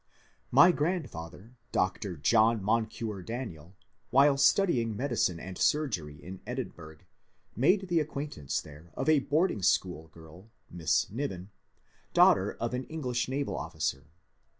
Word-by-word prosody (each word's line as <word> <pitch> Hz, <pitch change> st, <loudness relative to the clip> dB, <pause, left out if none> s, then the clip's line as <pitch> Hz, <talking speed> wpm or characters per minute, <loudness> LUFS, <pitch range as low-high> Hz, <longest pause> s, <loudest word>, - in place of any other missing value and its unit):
My 145 Hz, +8 st, +7 dB
grandfather, 125 Hz, -, -4 dB, 0.2 s
Dr. 95 Hz, -1 st, -1 dB
John 110 Hz, +7 st, +3 dB
Moncure 110 Hz, -1 st, -1 dB
Daniel, 95 Hz, -, -7 dB, 0.3 s
while 140 Hz, +2 st, +5 dB
studying 135 Hz, -, +3 dB
medicine 120 Hz, -9 st, 0 dB
and 95 Hz, +1 st, -8 dB
surgery 105 Hz, -, 0 dB
in 95 Hz, +1 st, -9 dB
Edinburgh, 85 Hz, -, -6 dB, 0.5 s
made 185 Hz, -, +3 dB
the 170 Hz, -2 st, +2 dB
acquaintance 140 Hz, -, -3 dB
there 75 Hz, +3 st, -14 dB
of -, -, -3 dB
a 155 Hz, -2 st, +5 dB
boarding 150 Hz, -, 0 dB
school 90 Hz, -3 st, +1 dB
girl, 80 Hz, +6 st, -15 dB, 0.2 s
Miss 80 Hz, -2 st, +1 dB
Niven, 105 Hz, -6 st, -5 dB, 0.6 s
daughter -, -, +5 dB
of -, -, -2 dB
an 125 Hz, +1 st, -3 dB
English 130 Hz, -6 st, -2 dB
naval 140 Hz, +1 st, -2 dB
officer. 75 Hz, -4 st, -3 dB
110 Hz, 125 wpm, -29 LUFS, 85-140 Hz, 0.6 s, My